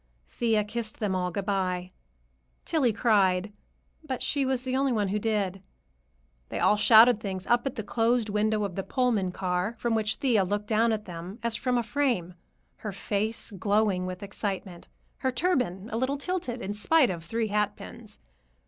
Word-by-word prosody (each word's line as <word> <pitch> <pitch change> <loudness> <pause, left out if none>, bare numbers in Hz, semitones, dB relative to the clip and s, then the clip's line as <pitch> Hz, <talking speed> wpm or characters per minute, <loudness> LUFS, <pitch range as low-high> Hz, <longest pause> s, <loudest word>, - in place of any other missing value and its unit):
Thea 220 - +1
kissed 215 +1 -5
them 205 -3 0
all 180 -1 0
good 190 +2 -4
bye. 185 -2 -1 0.7
Tillie 290 -8 +2
cried, 205 -3 +2 0.5
but 265 -5 -3
she 280 -2 0
was 260 -1 0
the 260 0 -2
only 270 0 +2
one 210 -4 0
who 210 +2 0
did. 200 -3 -1 0.9
They - - -4
all 210 - +4
shouted 220 +2 +7
things 190 -3 -4
up 240 +2 +2
at 265 - -4
the 220 - -4
closed 230 +1 +1
window 210 +1 +1
of 200 -2 -3
the 195 - -2
Pullman 225 -5 0
car, 180 +3 -2
from 235 0 -1
which 220 -2 +1
Thea 235 -7 +2
looked 205 +3 -2
down 225 +2 +2
at 215 -1 -2
them 175 +3 -8
as 235 -1 0
from 250 +1 0
a 240 - +1
frame, 230 -8 0 0.4
her 215 - -5
face 210 +3 -2
glowing 200 -1 +1
with 185 +2 -6
excitement, 195 -3 -4 0.3
her 260 - 0
turban 250 - 0
a - - 0
little 260 +4 0
tilted 280 -6 -3
in 200 - -3
spite 260 +5 +3
of 170 -2 -6
three 225 +5 -2
hatpins. 210 +1 -3
215 Hz, 175 wpm, -27 LUFS, 195-240 Hz, 0.9 s, shouted